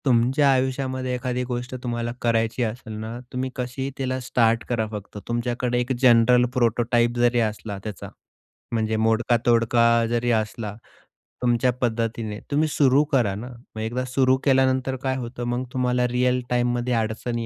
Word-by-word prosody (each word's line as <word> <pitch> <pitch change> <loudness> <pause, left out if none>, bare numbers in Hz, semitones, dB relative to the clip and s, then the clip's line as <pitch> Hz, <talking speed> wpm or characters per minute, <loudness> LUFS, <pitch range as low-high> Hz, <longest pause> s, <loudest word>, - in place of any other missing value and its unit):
तुमच्या 130 +3 +3
आयुष्यामध्ये 130 -1 -1
एखादी 125 0 -2
गोष्ट 125 0 -4
तुम्हाला 120 -1 -2
करायची 115 +1 +1
असेल 110 0 -5
ना, 110 +2 -6
तुम्ही 130 +1 -2
कशीही 130 +2 -4
तिला 130 -1 -2
स्टार्ट 115 -2 +1
करा. 115 -3 0
फक्त 105 -1 -7
तुमच्याकडे 120 +1 -1
एक 125 +2 -2
जनरल 125 0 +5
प्रोटोटाइप 120 0 +2
जरी 120 0 +3
असला 110 -2 -2
त्याचा, 105 -4 -7 0.6
म्हणजे 110 -1 0
मोडका-तोडका 115 +1 +2 0.2
जरी 120 +1 +1
असला, 110 -1 -2 0.7
तुमच्या 125 +1 +2
पद्धतीने 115 -2 -2
तुम्ही 150 +2 +2
सुरू 140 -1 +3
करा 115 -8 +2
ना. 110 +5 -6 0.3
मग 110 - -4
एकदा 120 +3 -2
सुरू 130 0 +2
केल्यानंतर 130 -1 +2
काय 130 -1 0
होतं, 120 -1 -6
मग 120 +1 -1
तुम्हाला 125 -1 +1
रिअल 125 +1 +1
टाईममध्ये 120 0 0
अडचणी 115 +1 -2
120 Hz, 145 wpm, -24 LUFS, 115-125 Hz, 0.7 s, जनरल